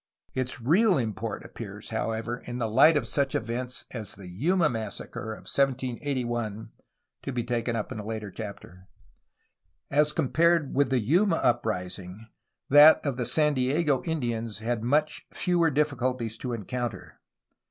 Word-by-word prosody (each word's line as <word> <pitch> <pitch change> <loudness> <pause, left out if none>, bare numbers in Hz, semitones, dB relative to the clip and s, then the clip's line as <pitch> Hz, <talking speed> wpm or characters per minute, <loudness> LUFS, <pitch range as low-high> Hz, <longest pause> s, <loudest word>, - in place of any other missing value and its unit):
Its 130 -1 -2
real 180 - +4
import 110 -6 -3
appears, - - -8
however, 115 +2 -2
in 120 0 -5
the 115 -2 -1
light 135 +8 +6
of 135 - -1
such 135 +3 0
events 120 +3 -3
as 110 -4 -6
the 95 -2 -11
Yuma 155 - +2
massacre 110 -2 -5
of - - -11
1781 125 -4 -1 0.5
(to 140 - -4
be 120 -2 -2
taken 120 0 -1
up 105 - -3
in - - -5
a - - -5
later 110 -2 -5
chapter). 95 -3 -9 1.0
As 150 +2 +4
compared 165 +1 +2
with 140 +1 +2
the 130 - +2
Yuma 165 - +3
uprising 90 - -2 0.4
that 145 +3 +8
of 140 -3 0
the 125 -2 -2
San 150 +3 +3
Diego 135 +2 +1
Indians 120 - -2
had 115 +1 -2
much 150 +4 0
fewer 175 -2 +2
difficulties 130 -6 0
to 125 - -4
encounter. 120 -1 -5
125 Hz, 145 wpm, -27 LUFS, 110-145 Hz, 1.0 s, that